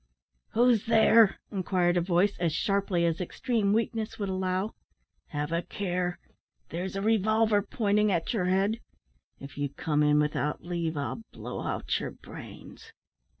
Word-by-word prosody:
"Who's 235 -2 +3
there?" 225 -2 +5
inquired 180 -2 +1
a 175 - +3
voice, 180 +3 +2
as 170 -2 +1
sharply 195 -4 +1
as 165 +1 0
extreme 205 +3 0
weakness 225 0 -1
would 200 -2 -3
allow. 185 +2 -1 0.5
"Have 150 +1 -3
a 170 +1 +1
care! 180 -2 -2 0.5
There's 180 +3 -4
a 195 - -2
revolver 220 0 +3
pointing 210 0 +1
at 170 +5 0
your 195 -6 0
head. 195 +5 +1 0.6
If 140 +1 -10
you 145 -1 0
come 150 +2 -1
in 150 0 +4
without 150 0 -1
leave, 170 -3 -2
I'll 145 +10 -3
blow - - -6
out - - -1
your - - -4
brains." - - -12
190 Hz, 150 wpm, -28 LUFS, 170-215 Hz, 0.6 s, there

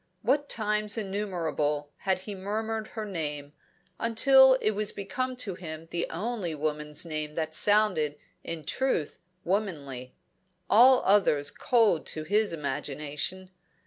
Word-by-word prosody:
What 280 +5 +1
times 210 -1 0
innumerable 170 -8 -2
had 190 -1 -1
he 205 +2 -7
murmured 215 +3 -3
her 220 -2 -6
name, 150 -6 -4 0.5
until 265 +3 +6
it 215 -4 0
was 210 0 -1
become 255 +6 -3
to 220 -6 -1
him 165 -3 -8
the 175 - -1
only 190 -2 -3
woman's 150 +1 -2
name 155 -2 -4
that 160 0 -3
sounded 185 -7 +3 0.3
in 165 -2 -5
truth 250 - -1 0.2
womanly 145 -10 -3 0.5
all 250 +3 +6
others 150 -8 +3
cold 225 -9 +2
to 155 - -1
his 205 +5 +1
imagination. 150 +4 -4
190 Hz, 125 wpm, -28 LUFS, 155-215 Hz, 0.5 s, until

